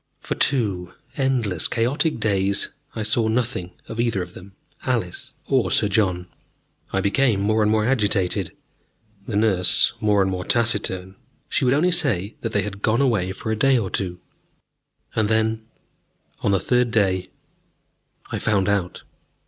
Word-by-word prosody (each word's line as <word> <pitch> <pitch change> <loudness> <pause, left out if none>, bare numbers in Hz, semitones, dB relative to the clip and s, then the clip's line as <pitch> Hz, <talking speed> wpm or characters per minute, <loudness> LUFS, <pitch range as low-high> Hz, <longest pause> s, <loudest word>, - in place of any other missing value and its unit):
For - - -3
two 100 -10 0 0.2
endless, 125 - +1
chaotic 130 +5 0
days, 100 -2 +1 0.3
I 110 - -2
saw 110 +1 +2
nothing 110 -6 -1
of 115 - -7
either 115 -6 +1
of 90 0 -12
them, 95 +2 -13 0.3
Alice 115 -9 -2
or 130 -9 +1
Sir 105 - +3
John. 95 -3 0 0.6
I 95 - 0
became 110 +1 +2
more 110 +2 +1
and 105 0 +3
more 110 -1 +2
agitated, 105 -7 +1 0.8
the 110 - -3
nurse 100 -4 +3
more 105 -2 +3
and 95 - -1
more 90 -1 -3
taciturn. 100 -5 +1 0.3
She - - +1
would 125 +2 +3
only 175 +5 +3
say 120 - +1
that 115 - -3
they 100 -2 +1
had 100 -1 -6
gone 110 +3 +2
away 110 -9 +1
for 110 +3 -4
a - - +1
day 135 +4 +3
or 100 -5 -2
two. 90 -2 -3 1.0
And 110 -2 +1
then, 110 0 0 0.7
on - - 0
the 100 -1 +3
third 125 +3 +1
day, 95 -4 +1 1.0
I - - -2
found 100 -3 +1
out. 100 -3 -1
105 Hz, 155 wpm, -22 LUFS, 95-115 Hz, 1.0 s, Sir